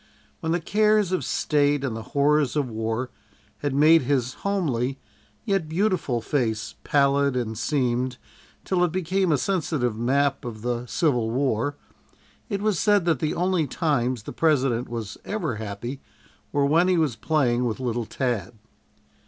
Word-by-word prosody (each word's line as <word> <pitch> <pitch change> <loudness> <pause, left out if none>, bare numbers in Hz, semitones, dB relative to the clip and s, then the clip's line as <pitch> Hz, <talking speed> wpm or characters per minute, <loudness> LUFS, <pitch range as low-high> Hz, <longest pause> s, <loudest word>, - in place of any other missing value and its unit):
When 160 - -2
the 175 - +1
cares 210 +1 +2
of 185 - 0
State 145 -1 +1
and 130 -5 -2
the 115 - -5 0.2
horrors 145 -2 +3
of 145 -3 +1
war 115 +3 -2 0.5
had 145 -2 -2
made 155 +3 +6
his 130 -1 0
homely 135 -10 -1 0.5
yet 195 -6 0
beautiful 165 - 0
face 110 -4 -1
pallid 140 -1 +2
and 115 -3 -2
seamed, 125 0 0 0.5
till 180 -2 +1
it 175 - +1
became 185 +1 0
a 150 - +4
sensitive 150 - -1
map 135 +4 +1
of 115 -3 -7
the 120 0 -2
Civil 120 -2 +1
War, 130 +2 0 0.7
it 200 -2 -2
was 215 -5 +1
said 205 -4 +3
that 165 -6 +2
the 155 - -1
only 180 -3 +1
times 130 - 0
the - - -7
President 135 -6 +1
was 115 -3 -5
ever 205 - -3
happy 110 +5 -6 0.5
were 145 -1 +2
when 165 +5 +4
he 185 -1 +3
was 155 -8 +1
playing 125 -1 +1
with 115 -1 -2
little 120 -3 -2
Tad. 115 -6 -2
140 Hz, 155 wpm, -25 LUFS, 120-165 Hz, 0.7 s, made